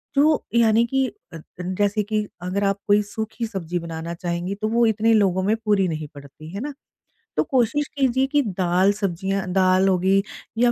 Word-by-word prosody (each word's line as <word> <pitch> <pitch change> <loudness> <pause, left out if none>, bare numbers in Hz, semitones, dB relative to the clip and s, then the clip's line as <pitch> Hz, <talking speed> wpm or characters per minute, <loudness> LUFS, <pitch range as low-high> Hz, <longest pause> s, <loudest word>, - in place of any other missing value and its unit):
जो 300 +2 +3
यानी 230 0 +4
कि 265 +2 +1 0.3
अ - - -6
अ, - - -10 0.2
जैसे 205 +3 0
कि 210 +1 -1 0.2
अगर 185 +3 -2
आप 200 0 +1
कोई 205 0 +5
सूखी 220 +1 -3
सब्ज़ी 180 -4 -4
बनाना 165 0 -6
चाहेंगी, 175 +2 -3
तो 215 +2 -2
वो 235 +1 +3
इतने 220 +1 +3
लोगों 190 -4 +3
में 210 +3 +2
पूरी 200 -3 +3
नहीं 155 -2 -4
पड़ती। 145 +2 -12
है 200 - -4
ना? 290 +1 -4 0.6
तो - - +4
कोशिश 270 +1 +1
कीजिए 260 -1 +2
कि 290 +1 +2
दाल, 185 -3 +2
सब्ज़ियाँ, 195 0 -2
दाल 185 0 +4
हो 185 -1 +3
गई 195 +2 +3 0.4
या 240 +1 +4
200 Hz, 190 wpm, -23 LUFS, 185-230 Hz, 0.6 s, कोई